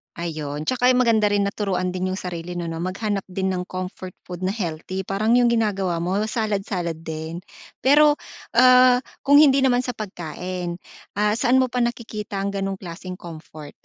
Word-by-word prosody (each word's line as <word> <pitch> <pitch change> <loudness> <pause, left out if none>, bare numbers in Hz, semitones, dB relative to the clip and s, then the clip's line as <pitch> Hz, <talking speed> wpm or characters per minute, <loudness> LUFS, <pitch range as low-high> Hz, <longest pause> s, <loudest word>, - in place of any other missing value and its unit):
Ayun, 155 -3 -4
tsaka 250 0 +3
yung 250 - +3
maganda 220 -4 +3
rin 200 -1 +2
na 200 - -5
turuan 185 -3 -1
din 185 0 -1
yung 190 - -3
sarili 175 -1 -6
'no 175 -1 -4
na 165 +1 -4
maghanap 195 +1 -2
din 190 +1 -1
ng 185 -1 -1
comfort 185 0 -6 0.2
food 180 0 -7
na 190 - +1
healthy, 185 -1 -4
parang 215 +5 +2
yung 245 - +4
ginagawa 195 -7 0
mo 190 +3 0
salad-salad 195 -7 -2
din, 160 +1 -6 0.4
pero, 295 +2 +5 0.3
ah, 255 0 +6 0.2
kung 285 +1 +6
hindi 275 -3 +6
naman 250 -2 +3
sa 250 -1 -3
pagkain, 180 -2 -5 0.4
ah, 210 0 +2
saan 250 +4 +3
mo 250 - -3
pa 250 - -1
nakikita 230 -4 -3
ang 200 - -1
ganong 195 0 -2
klaseng 180 0 -8
comfort? 155 -3 -10
195 Hz, 180 wpm, -23 LUFS, 175-235 Hz, 0.4 s, ah